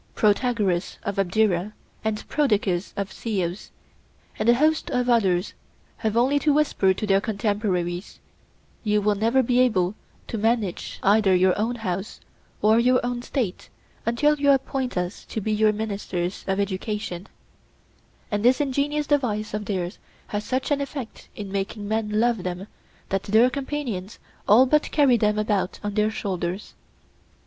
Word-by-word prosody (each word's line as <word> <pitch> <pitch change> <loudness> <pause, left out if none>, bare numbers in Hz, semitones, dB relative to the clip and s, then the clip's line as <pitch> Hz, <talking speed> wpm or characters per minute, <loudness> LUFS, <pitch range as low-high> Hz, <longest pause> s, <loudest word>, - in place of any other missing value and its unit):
Protagoras 210 -4 +1
of 200 0 -3
Abdera, 195 0 +1 0.3
and 220 -1 -2
Prodicus 210 -10 +1
of 200 -1 -3
Ceos, 190 -5 -3 0.7
and 215 +2 +2
a 240 - +7
host 310 +4 +2
of 250 0 0
others, 190 -5 +2 0.4
have 220 0 -1
only 265 +4 +3
to 295 +1 +2
whisper 285 -10 +3
to 190 +3 -2
their 195 -1 +3
contemporaries: 200 -4 -2 0.6
'You 210 -1 +2
will 210 0 +2
never 230 +6 +2
be 245 +1 +2
able 200 -7 +3 0.3
to 225 - -4
manage 220 -4 -1
either 200 -1 +4
your 185 0 +4
own 225 +4 -1
house 195 -3 -4 0.4
or 220 +2 +5
your 250 +1 +4
own 245 0 -2
State 240 -6 -3 0.3
until 295 +6 +2
you 285 0 +3
appoint 270 -3 +1
us 180 +2 -3
to - - -4
be 215 +1 -2
your 215 0 +3
ministers 200 -4 -3
of 195 0 0
education'—and 200 -1 -3 1.1
this 250 +4 +4
ingenious 290 +1 0
device 235 -8 0
of 210 0 -3
theirs 185 -2 -3 0.3
has 210 0 -2
such 260 +6 -2
an 285 -1 +2
effect 275 -4 -7
in 205 -2 -6
making 200 +1 -3
men 215 0 0
love 235 -3 +2
them 180 +1 -4 0.4
that 195 0 0
their 225 +6 +4
companions 255 -9 -4 0.3
all 230 +6 +7
but 300 +3 +2
carry 280 -5 +4
them 210 -1 +1
about 205 -3 0
on 205 0 -2
their 210 +1 +2
shoulders. 190 -3 -4
215 Hz, 150 wpm, -24 LUFS, 195-245 Hz, 1.1 s, a